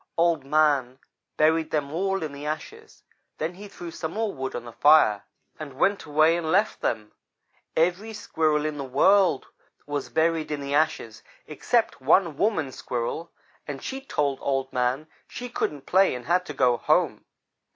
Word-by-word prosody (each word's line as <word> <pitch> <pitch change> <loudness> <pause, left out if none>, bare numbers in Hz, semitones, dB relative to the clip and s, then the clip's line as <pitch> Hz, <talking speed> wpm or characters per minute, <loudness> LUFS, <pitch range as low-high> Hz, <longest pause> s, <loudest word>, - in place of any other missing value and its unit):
"Old 165 -4 +2
man 140 -3 +2 0.4
buried 160 +1 +3
them 150 -2 -2
all 195 +1 -1
in 155 - -4
the 140 +1 -9
ashes 415 - -7 0.3
then 160 +3 -3
he 200 +3 -10
threw 175 -4 -9
some 160 0 -5
more 220 -1 -1
wood 130 0 -5
on 120 0 -5
the 120 - -8
fire 145 -8 +5 0.4
and 150 -3 -7
went 200 +6 +1
away 155 +2 +4
and 160 -2 -2
left 200 +5 +1
them. 105 -2 -2 0.7
Every 180 +7 +1
Squirrel 160 -7 0
there 150 0 +1
was 155 - -1
in 150 - -9
the - - -3
world 195 -4 +4 0.4
was 145 -1 -4
buried 160 0 +1
in 150 -1 -3
the 140 0 -4
ashes 155 +2 0 0.2
except 230 - 0
one 165 +4 +3
woman 160 -6 0
Squirrel, 125 +8 -4 0.4
and 140 -2 -6
she 270 0 -5
told 145 - -1
Old 135 -1 -1
man 125 +3 0 0.2
she 245 0 -7
couldn't 145 - -3
play 190 -5 +3
and 125 -1 -8
had 180 +4 +1
to 150 - -5
go 125 -2 +3
home. - - +1
155 Hz, 175 wpm, -25 LUFS, 140-180 Hz, 0.7 s, fire